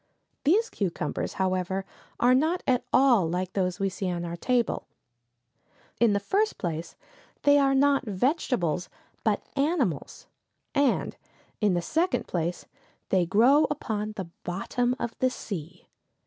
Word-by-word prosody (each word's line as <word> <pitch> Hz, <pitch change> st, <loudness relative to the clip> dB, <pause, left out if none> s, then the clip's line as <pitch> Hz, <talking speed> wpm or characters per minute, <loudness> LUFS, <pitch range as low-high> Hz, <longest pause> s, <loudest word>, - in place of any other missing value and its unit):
These 425 Hz, +10 st, +3 dB
cucumbers, 175 Hz, -6 st, -2 dB
however, 190 Hz, 0 st, -1 dB, 0.3 s
are 245 Hz, +1 st, +5 dB
not 315 Hz, +7 st, +2 dB
at 250 Hz, -2 st, +2 dB
all 240 Hz, -11 st, +4 dB
like 180 Hz, +2 st, -2 dB
those 180 Hz, -2 st, -1 dB
we 195 Hz, -, +1 dB
see 190 Hz, 0 st, -3 dB
on 175 Hz, -1 st, -3 dB
our 170 Hz, 0 st, -4 dB
tables. 240 Hz, +5 st, 0 dB, 1.2 s
In 235 Hz, -3 st, +4 dB
the 200 Hz, -, +2 dB
first 405 Hz, -, 0 dB
place, 165 Hz, -1 st, -4 dB, 0.5 s
they 285 Hz, 0 st, +6 dB
are 270 Hz, -1 st, +3 dB
not 275 Hz, -1 st, +3 dB
vegetables, 195 Hz, -, 0 dB, 0.3 s
but -, -, +1 dB
animals, 275 Hz, -, -1 dB, 0.5 s
and, 280 Hz, -3 st, +1 dB, 0.5 s
in 205 Hz, -4 st, +3 dB
the 175 Hz, -, -1 dB
second 335 Hz, -, 0 dB
place 175 Hz, 0 st, -3 dB, 0.4 s
they 180 Hz, -3 st, +2 dB
grow 250 Hz, -, +5 dB
upon 215 Hz, -7 st, -3 dB
the 195 Hz, -4 st, -5 dB, 0.2 s
bottom 245 Hz, +7 st, -1 dB
of 235 Hz, -1 st, -3 dB
the 255 Hz, -, +3 dB
sea. 180 Hz, -8 st, -7 dB
210 Hz, 135 wpm, -27 LUFS, 180-275 Hz, 1.2 s, they